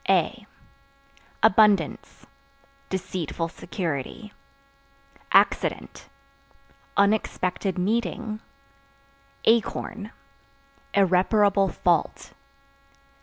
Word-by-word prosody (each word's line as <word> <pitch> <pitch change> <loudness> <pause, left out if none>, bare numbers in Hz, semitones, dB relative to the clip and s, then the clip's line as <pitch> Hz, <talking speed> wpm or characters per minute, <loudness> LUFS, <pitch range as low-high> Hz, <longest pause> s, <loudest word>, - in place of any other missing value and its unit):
A - - +1 1.0
Abundance 210 -1 +3 0.6
Deceitful 175 -3 -3
security. 180 - -5 1.0
Accident - - +1 0.9
Unexpected 200 -2 0
meeting. 215 +2 -2 1.1
Acorn 225 -1 0 0.8
Irreparable 195 +1 +3
fault. 170 -1 -1
200 Hz, 45 wpm, -25 LUFS, 180-215 Hz, 1.1 s, Abundance